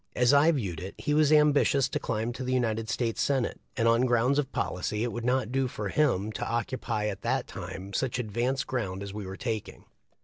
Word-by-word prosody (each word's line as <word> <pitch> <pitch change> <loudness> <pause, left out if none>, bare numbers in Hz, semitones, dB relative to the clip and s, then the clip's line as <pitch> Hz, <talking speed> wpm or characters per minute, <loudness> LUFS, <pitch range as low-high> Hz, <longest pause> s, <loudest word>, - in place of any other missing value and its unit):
As 125 +2 +4
I 145 +3 +6
viewed 100 - -2
it, 95 +3 -7
he 150 - -1
was 150 0 +4
ambitious 145 -3 +4
to - - -2
climb 115 +1 -2
to 130 - -5
the 130 - -2
United 115 -3 0
States 115 -3 -1
Senate, 135 -4 0 0.2
and 115 -2 +2
on 115 +2 +4
grounds 125 +4 +3
of 140 -2 -2
policy 105 +4 -2
it 120 - -1
would 120 0 -5
not 125 -1 +1
do 135 0 +1
for 105 -4 -4
him 110 -7 +1
to - - -4
occupy 115 -2 -2
at 105 -2 -3
that - - 0
time 95 +2 -7
such 130 +3 -1
advanced 125 +4 -1
ground 100 -7 -3
as 100 -1 -7
we 105 -2 -6
were 95 +1 -7
taking. 110 -4 -4
120 Hz, 215 wpm, -28 LUFS, 105-130 Hz, 0.2 s, I